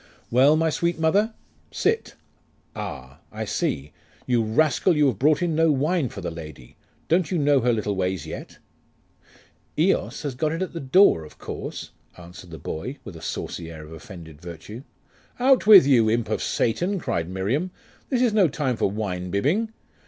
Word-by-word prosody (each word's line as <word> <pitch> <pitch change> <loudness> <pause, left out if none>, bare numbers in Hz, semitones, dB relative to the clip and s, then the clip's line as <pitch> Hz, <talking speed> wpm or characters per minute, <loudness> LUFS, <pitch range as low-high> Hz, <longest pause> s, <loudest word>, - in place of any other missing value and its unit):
'Well 135 +5 +5
my 160 0 +1
sweet 170 +2 0
mother? 200 +8 +2 0.3
Sit: - - -1 0.6
Ah? 65 +1 -7
I - - -5
see! 70 +2 -2 0.3
You 120 -2 +2
rascal, 150 - +2
you 150 - +4
have 130 - +1
brought 155 +5 +3
in 170 -2 0
no 160 0 +3
wine 150 0 +1
for 100 - -8
the 90 - -4
lady. 75 -6 -10 0.3
Don't 170 +1 +2
you 180 - 0
know 145 -2 +3
her 125 0 +2
little 105 -3 -1
ways 95 -3 -2
yet?' - - -8 1.2
'Eos 165 +1 +1
has 145 -3 -3
got 150 +5 -1
it 165 +3 -1
at 185 - -6
the 170 - -4
door, 135 - +4
of 75 - -14
course,' - - -7 0.3
answered 90 +1 -12
the 80 - -8
boy, 125 - -5
with 100 -6 -9
a 80 - -10
saucy 85 +1 -5
air 80 -2 -9
of 80 - -12
offended 80 -2 -11
virtue. 90 +7 -9 0.6
'Out 260 -2 +4
with 200 -9 +10
you, 120 -6 +4
imp 115 -1 0
of - - -1
Satan!' 180 - 0
cried 85 - -2
Miriam. 105 - -1 0.4
'This 255 -2 +1
is 235 -4 +2
no 205 -4 +5
time 135 -4 -2
for - - +1
winebibbing. 100 - -1
130 Hz, 175 wpm, -24 LUFS, -, 1.2 s, with